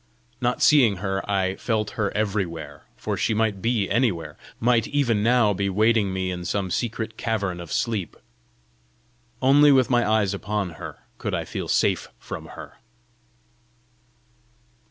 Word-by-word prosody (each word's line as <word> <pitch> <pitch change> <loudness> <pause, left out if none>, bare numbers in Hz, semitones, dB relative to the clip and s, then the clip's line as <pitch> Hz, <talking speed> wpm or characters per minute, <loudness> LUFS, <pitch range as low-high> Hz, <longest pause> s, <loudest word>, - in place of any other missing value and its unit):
Not 125 0 0
seeing 125 -9 +5
her, 95 +1 -2
I 95 -1 +1
felt 110 -3 -1
her 105 -3 -1
everywhere, 85 -9 -3
for - - -3
she 110 - 0
might 105 -3 0
be 115 -3 +1
anywhere 90 - 0 0.2
might 120 -2 +2
even 125 -7 +1
now 115 -2 +3
be 100 +1 -1
waiting 105 0 +2
me 95 -1 -2
in 90 -1 -5
some 95 +1 -2
secret 110 -1 -3
cavern 100 -6 -2
of 85 - -10
sleep! 105 -7 -2 1.3
Only 145 +2 +6
with 130 -2 +4
my 120 -1 +4
eyes 105 -3 +2
upon 100 -2 -2
her - - -8 0.2
could - - -2
I - - -3
feel - - -5
safe - - +1
from - - -8
her! - - -11
105 Hz, 145 wpm, -24 LUFS, 95-115 Hz, 1.3 s, Only